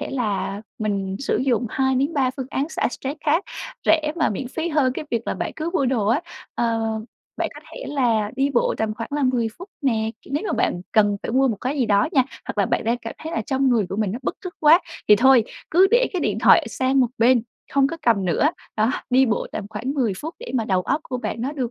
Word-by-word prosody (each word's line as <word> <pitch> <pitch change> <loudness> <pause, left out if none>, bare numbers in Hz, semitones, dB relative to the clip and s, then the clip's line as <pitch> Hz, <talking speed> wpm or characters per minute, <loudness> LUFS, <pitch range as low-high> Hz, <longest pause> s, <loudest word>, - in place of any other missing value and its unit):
thể - - -4
là 210 -5 -2 0.2
mình 195 -3 -2
sử 275 - 0
dụng 250 -2 +1
2-3 265 +1 +1
phương 260 -2 -4
án 280 +3 -1
xả - - 0
stress 270 +3 -5
khác 320 +5 +2 0.4
rẻ 305 -2 +3
mà 320 - +2
miễn 245 +5 -4
phí 325 +5 -3
hơn 295 -5 +2
cái 285 - -5
việc 235 -1 -2
là - - -1
bạn - - -3
cứ 325 +1 -3
mua 280 -7 +1
đồ 240 -5 +1
á. 235 +8 +3 0.3
Ờ, 230 -1 0 0.6
bạn - - -1
có - - -10
thể - - -7
là 230 -7 +1
đi 275 +1 +2
bộ 245 - +2
tầm 220 -1 -1
khoảng 230 +1 -6
là 295 -1 0
10 245 -3 +2
phút 360 - -9
nè, 225 -5 +1
kiểu, - - -13
nếu 300 - 0
mà - - -1
bạn 175 - 0
cần 205 -2 +4
phải - - -4
mua 265 +1 +4
một 225 - -1
cái 275 +4 -2
gì 250 - +2
đó 205 +8 +3
nha, 265 - +5 0.2
hoặc - - -6
là - - +3
bạn - - 0
đang 235 +2 +1
cảm 230 -1 -7
thấy 320 +1 -6
là - - 0
trong 270 -1 +1
người 230 -6 +2
của 195 - -4
mình 210 -3 0
nó 235 - -4
bứt - - -2
rứt 365 - -6
quá 315 +3 +7 0.3
thì 210 - +8
thôi 260 0 +6 0.3
cứ 370 +4 +6
để - - +4
cái 365 - -1
điện - - 0
thoại - - +5
sang 260 +1 +1
một 250 - +4
bên, 240 +1 +4 0.3
hông 275 -1 +4
có 330 - -4
cầm 225 -8 +3
nữa. 185 - +2 0.3
Đó, 220 +2 +3 0.2
đi 260 +1 +5
bộ 225 - 0
tầm 210 - -4
khoảng 235 +6 -4
10 245 -8 +1
phút 320 +3 -6
để - - -8
mà 235 -3 +1
đầu 190 -3 +1
óc 280 - 0
của 255 - -4
bạn 240 - -4
nó 265 +5 -2
được, 260 -6 -3
255 Hz, 255 wpm, -22 LUFS, 225-290 Hz, 0.6 s, thì